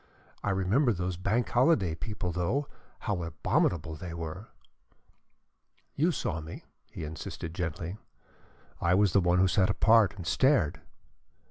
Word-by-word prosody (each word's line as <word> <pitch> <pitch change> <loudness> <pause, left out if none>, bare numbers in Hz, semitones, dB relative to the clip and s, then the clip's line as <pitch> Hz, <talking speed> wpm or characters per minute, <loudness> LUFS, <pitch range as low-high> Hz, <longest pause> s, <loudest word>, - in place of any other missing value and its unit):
"I - - 0
remember 105 +7 +2
those 90 -1 -3
Bank 100 +7 0
Holiday 120 - +3
people, 90 +3 -4
though, 90 - -1 0.3
how 100 -5 -2
abominable 85 0 0
they 85 +2 -7
were." 85 +5 -6 1.5
"You 165 +5 +2
saw 80 - -2
me," 80 +1 -9 0.3
he - - -7
insisted 80 +1 -6
gently. 90 +3 -4 0.8
"I 85 +1 +3
was 100 -2 +3
the 100 - +5
one 90 0 +2
who 95 +1 +4
sat 95 +2 +2
apart 105 0 +4
and 90 - -7
stared." 90 - +2
90 Hz, 135 wpm, -29 LUFS, 85-105 Hz, 1.5 s, the